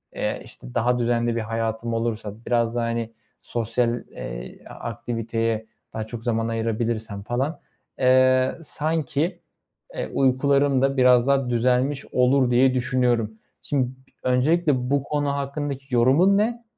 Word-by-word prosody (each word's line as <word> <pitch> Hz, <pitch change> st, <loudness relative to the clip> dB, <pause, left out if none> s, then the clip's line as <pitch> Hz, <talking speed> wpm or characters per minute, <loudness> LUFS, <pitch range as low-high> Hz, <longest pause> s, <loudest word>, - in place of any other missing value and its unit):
eee, -, -, -2 dB
işte, -, -, -13 dB
daha 125 Hz, +1 st, +2 dB
düzenli 120 Hz, 0 st, +1 dB
bir -, -, 0 dB
hayatım 115 Hz, +1 st, -2 dB
olursa, 115 Hz, -2 st, -2 dB
biraz 115 Hz, -1 st, +1 dB
daha, 120 Hz, -1 st, 0 dB
hani, 115 Hz, -1 st, -2 dB, 0.3 s
sosyal, 120 Hz, +1 st, -1 dB
eee, -, -, -7 dB
a -, -, -9 dB
aktiviteye 115 Hz, -1 st, -3 dB, 0.3 s
daha 110 Hz, -1 st, -4 dB
çok 115 Hz, 0 st, -7 dB
zaman 115 Hz, -1 st, 0 dB
ayırabilirsem 115 Hz, -2 st, -2 dB
falan, 130 Hz, +9 st, -2 dB, 0.4 s
eee, 130 Hz, 0 st, +4 dB
sanki, 160 Hz, +3 st, -1 dB, 0.6 s
eee, -, -, -3 dB
uykularım 140 Hz, +1 st, +3 dB
da 135 Hz, 0 st, +1 dB
biraz 125 Hz, -1 st, +5 dB
daha 135 Hz, -2 st, +2 dB
düzelmiş 125 Hz, +4 st, +1 dB
olur 125 Hz, 0 st, +3 dB
diye 130 Hz, +2 st, +4 dB
düşünüyorum. 125 Hz, -3 st, +1 dB, 0.3 s
Şim 140 Hz, -3 st, 0 dB
b -, -, -8 dB, 0.4 s
öncelikle 130 Hz, 0 st, +2 dB
bu 140 Hz, -1 st, +2 dB
konu 145 Hz, -1 st, -1 dB
hakkındaki 140 Hz, -1 st, -3 dB
yorumun 145 Hz, +12 st, +5 dB
ne? 235 Hz, +3 st, 0 dB
125 Hz, 135 wpm, -24 LUFS, 115-135 Hz, 0.6 s, biraz